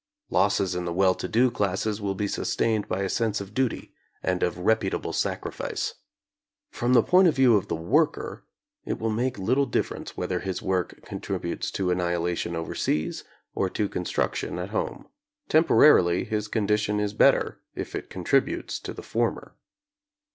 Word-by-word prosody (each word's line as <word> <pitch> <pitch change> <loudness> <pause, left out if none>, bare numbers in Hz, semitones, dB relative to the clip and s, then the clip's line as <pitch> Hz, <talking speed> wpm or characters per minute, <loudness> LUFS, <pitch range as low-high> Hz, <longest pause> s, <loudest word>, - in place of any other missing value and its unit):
Losses 100 -2 +2
in 90 0 -3
the 85 - -2
well 95 +1 +4
to - - -5
do 120 +3 +3
classes 105 0 -1
will 100 -1 -1
be 100 +1 -1
sustained 110 +1 0
by 95 +2 -1
a - - 0
sense 110 +1 0
of 100 0 -8
duty 130 0 -1 0.3
and 90 -1 0
of 90 - 0
reputable 100 +2 0
sacrifice. - - -2 0.8
From 120 +1 0
the 120 -3 +6
point 185 +1 +5
of 160 - +2
view 130 -4 +5
of 100 -1 +1
the - - -1
worker, 80 +2 0 0.4
it - - -3
will 110 0 -1
make 120 +4 -1
little 130 +8 +1
difference 120 - -3
whether - - -1
his 95 -2 -3
work 95 -3 -2
con - - -6
tributes - - -3
to 95 -2 0
annihilation 85 -1 -1
overseas 80 -1 -2 0.3
or 95 - 0
to 105 +2 -1
construction 90 -1 -2
at 90 +2 -4
home. 110 - -3 0.4
Temporarily, 150 - +5
his 105 -1 -2
condition 105 -1 0
is 105 0 -1
better 135 +5 +3 0.2
if - - -5
it - - -5
contributes - - 0
to - - -6
the - - -8
former. - - -2
100 Hz, 165 wpm, -26 LUFS, 90-110 Hz, 0.8 s, the